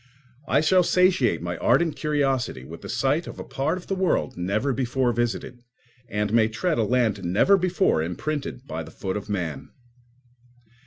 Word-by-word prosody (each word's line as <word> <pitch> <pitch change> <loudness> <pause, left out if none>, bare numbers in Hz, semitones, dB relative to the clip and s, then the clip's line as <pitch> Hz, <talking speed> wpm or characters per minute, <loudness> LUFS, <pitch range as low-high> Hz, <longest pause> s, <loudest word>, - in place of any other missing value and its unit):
I - - +3
shall 185 +4 +4
satiate 170 - +2
my 85 0 -3
ardent 150 +6 +2
curiosity 135 - -1
with 80 +4 -10
the - - -9
sight 145 +6 0
of - - -8
a - - -6
part 155 +6 -2
of 180 - -10
the - - -2
world 185 -8 0
never 105 +10 -1
before 125 0 0
visited, 120 +1 -2 0.5
and 105 +1 -1
may 115 -1 +5
tread 155 +8 -1
a - - +3
land 110 -3 +1
never 100 - +4
before 185 - +1
imprinted 135 - -4
by 80 - -5
the 80 - -9
foot 95 +3 -4
of 105 0 -5
man. 80 -9 -3
120 Hz, 170 wpm, -25 LUFS, 100-155 Hz, 0.5 s, may